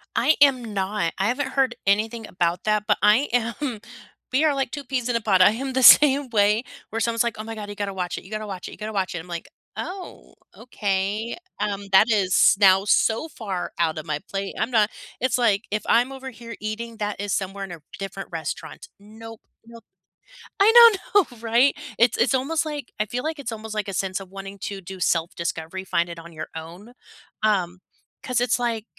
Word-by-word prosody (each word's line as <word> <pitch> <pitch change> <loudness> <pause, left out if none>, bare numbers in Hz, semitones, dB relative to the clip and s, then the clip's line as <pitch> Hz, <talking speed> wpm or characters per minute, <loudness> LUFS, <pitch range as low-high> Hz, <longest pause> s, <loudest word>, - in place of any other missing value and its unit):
I 310 - +3
am 255 -6 +4
not. 195 -3 -1
I 195 - +1
haven't 265 +4 -1
heard 265 -3 +1
anything 215 +3 0
about 175 -1 -1
that, 215 -1 +1
but - - +3
I 215 +7 +4
am 235 +1 -1 0.5
we 265 +5 +2
are 305 - +3
like 270 -2 -1
2 285 - -5
peas 250 -2 -2
in 240 - 0
a 230 - +1
pod, 195 -4 +3
I 185 - +7
am 265 +4 -4
the 260 - +1
same 280 0 +8
way 210 0 +3 0.3
where 225 - -3
someone's 230 0 +1
like, 235 -1 -2
"Oh 215 - -4
my 225 0 -7
god, 210 -1 -7
you 205 - -7
gotta 200 -1 -3
watch 180 -1 -3
it, - - -8
you 190 - -15
gotta 215 0 -4
watch 190 -2 -6
it, - - -8
you - - -11
gotta 215 +1 -6
watch 190 -3 -1
it." - - -3
I'm 165 - -11
like, 170 -1 -6 0.3
"Oh, 370 0 -8 0.2
okay." 210 -1 -2 0.2
Um, 200 -1 -3
that 210 +5 +6
is 195 -3 +4
now 190 -1 +5
so 225 +7 +2
far 200 - -5
out 165 -2 +1
of 155 - -6
my 150 -2 -2
plate. 195 0 -4
I'm 220 - 0
not 220 -3 +3 0.3
It's 255 -1 +1
like, 220 -4 +2
"If 210 +1 -1
I'm 245 +3 +3
over 265 0 -7
here 230 -1 -10
eating, 225 +2 -5
that 205 -2 -3
is 200 -1 -2
somewhere 195 +1 -3
r - - -2
in 190 - -11
a 165 -3 -9 0.2
different 195 0 -6
restaurant. 160 -2 -6
Nope, 220 +2 -12 0.2
nope." 230 -1 -14 0.8
I 405 +3 +6 0.4
know, 410 - +7
no, 245 - -14
right? 235 +4 +3 0.2
It's 235 0 +3
it's 255 - +2
almost 310 +5 0
like 295 -4 -6
I 215 - +1
feel 245 +4 -4
like 315 0 -3
it's 260 -5 -5
almost 220 0 -7
like 215 -2 -2
a 195 - -4
sense 190 0 -2
of 190 -2 -11
wanting 195 0 -9
to 200 -1 -5
do 190 +1 -9
self 170 -1 0
discovery, 170 +2 -4
find 175 -2 0
it 170 -1 -8
on 170 0 -12
your 155 0 -7
own, 170 +8 -9 0.5
um, 185 -4 +1 0.4
'cause 250 -2 0
it's 245 0 +1
like 230 -3 -2
215 Hz, 220 wpm, -23 LUFS, 195-240 Hz, 0.8 s, same